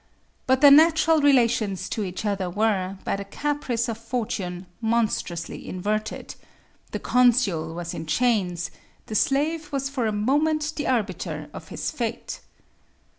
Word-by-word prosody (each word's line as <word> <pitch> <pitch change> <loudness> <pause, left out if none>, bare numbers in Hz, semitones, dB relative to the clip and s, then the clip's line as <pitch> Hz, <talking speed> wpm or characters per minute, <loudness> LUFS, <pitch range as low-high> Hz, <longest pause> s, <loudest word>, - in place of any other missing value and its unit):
But 260 +1 +3
their 285 -1 +9
natural 320 +1 +6
relations 235 -8 +2
to 220 - -2
each 185 +2 -5
other 195 -3 -1
were, 195 -1 0
by - - -1
the 200 - -5
caprice 250 +1 -2
of 225 -1 -4
fortune, 210 -6 -3 0.2
monstrously 220 -7 -1
inverted: 215 +4 -3 0.6
the - - -3
consul 225 -11 +2
was 170 0 -5
in 160 - -6
chains; 180 -3 +1 0.3
the - - -7
slave 300 +7 +1
was 275 -1 -1
for 250 -5 -1
a - - 0
moment 295 +8 +1
the 295 - -3
arbiter 215 -8 -2
of - - -9
his - - -4
fate. - - -4
225 Hz, 140 wpm, -25 LUFS, 195-275 Hz, 0.6 s, their